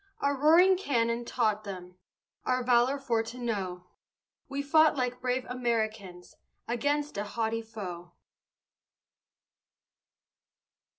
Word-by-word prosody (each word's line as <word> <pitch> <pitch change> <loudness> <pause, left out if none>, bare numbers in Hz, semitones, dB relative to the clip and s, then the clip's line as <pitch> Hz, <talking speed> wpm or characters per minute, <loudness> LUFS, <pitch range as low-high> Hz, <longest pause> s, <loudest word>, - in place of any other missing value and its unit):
Our 280 0 +1
roaring 335 +7 +5
cannon 235 -8 0
taught 215 -4 0
them 180 -3 -8 0.5
Our 255 0 0
valor 245 +2 +3
for 245 -5 0
to 230 +2 -8
know; 195 -7 -3 0.6
We 280 0 -3
fought 310 +2 +5
like 250 -1 -2
brave 250 0 -1
Americans 220 -7 -3 0.3
Against 285 +1 -1
a - - -1
haughty 225 +2 -2
foe. 185 -6 -8
235 Hz, 105 wpm, -29 LUFS, 215-270 Hz, 0.6 s, roaring